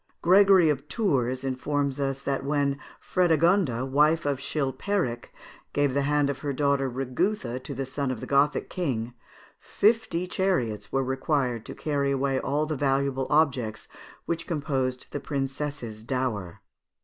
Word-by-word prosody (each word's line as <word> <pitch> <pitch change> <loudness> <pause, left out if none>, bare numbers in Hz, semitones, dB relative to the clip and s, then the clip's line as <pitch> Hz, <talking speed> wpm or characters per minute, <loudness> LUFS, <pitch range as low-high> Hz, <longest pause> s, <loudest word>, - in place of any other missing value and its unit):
Gregory 190 -1 +6
of 140 0 -4
Tours 130 - 0
informs 140 +1 -1
us, 135 -1 -1
that 140 -1 -2
when 140 -1 0 0.2
Frédégonde, 165 - +2
wife 150 +3 +3
of 140 -2 0
Chilpéric, 140 - -1 0.5
gave 145 -2 +2
the 140 - +1
hand 145 0 +2
of 140 -1 -3
her 145 0 -2
daughter 140 -1 +1
Rigouthe 130 - -2
to 140 +1 -7
the 135 +1 -3
son 135 +1 -3
of 130 -3 -3
the - - -6
Gothic 140 +1 +2
king, 125 -9 -2 0.5
fifty 220 -5 +1
chariots 125 - -1
were 135 0 +1
required 130 -3 -1
to - - -7
carry 140 -2 -1
away 135 -1 +1
all 145 +4 0
the 155 0 -2
valuable 135 -1 0
objects 135 -8 +1 0.4
which 170 0 -3
composed 135 -5 -1
the 145 - -3
princess's 135 -5 -4
dower. 115 -8 -3
140 Hz, 145 wpm, -26 LUFS, 130-150 Hz, 0.5 s, Gregory